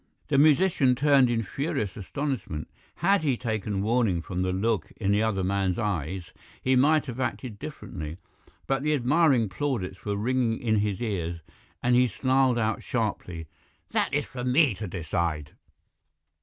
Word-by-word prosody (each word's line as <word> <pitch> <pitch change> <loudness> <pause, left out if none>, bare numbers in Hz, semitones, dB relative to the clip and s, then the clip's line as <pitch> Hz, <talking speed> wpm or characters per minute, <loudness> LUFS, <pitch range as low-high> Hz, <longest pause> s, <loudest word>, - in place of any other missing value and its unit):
"The 140 -2 +3
musician 150 -3 +4
turned 135 -2 +4
in 115 -1 0
furious 135 - -3
astonishment. 110 - -4 0.3
Had 195 +3 +3
he 140 -6 +1
taken 105 -4 -2
warning 110 -7 +1
from 90 +1 -3
the 95 0 0
look 100 -1 -1
in 100 -2 0
the 105 +1 +3
other 105 -4 0
man's 95 -1 0
eyes 90 -5 -3 0.3
he 130 0 +2
might 150 +4 +4
have 125 -2 -6
acted 125 -4 -3
differently. 75 -3 -7 0.5
But 135 0 0
the 150 +1 +2
admiring 135 -2 +3
plaudits 95 -4 -3
were 100 -1 -1
ringing 120 +1 +1
in 110 -2 +1
his 105 +1 -1
ears, 85 -6 -3 0.4
and 125 0 +3
he 125 +1 +5
snarled 130 +2 +2
out 110 -1 0
sharply, 100 -8 -3 0.5
'That - - +1
is - - 0
for 125 -2 -7
me 130 +1 +4
to 105 +2 -6
decide.' 80 -3 -2
115 Hz, 155 wpm, -27 LUFS, 95-130 Hz, 0.5 s, he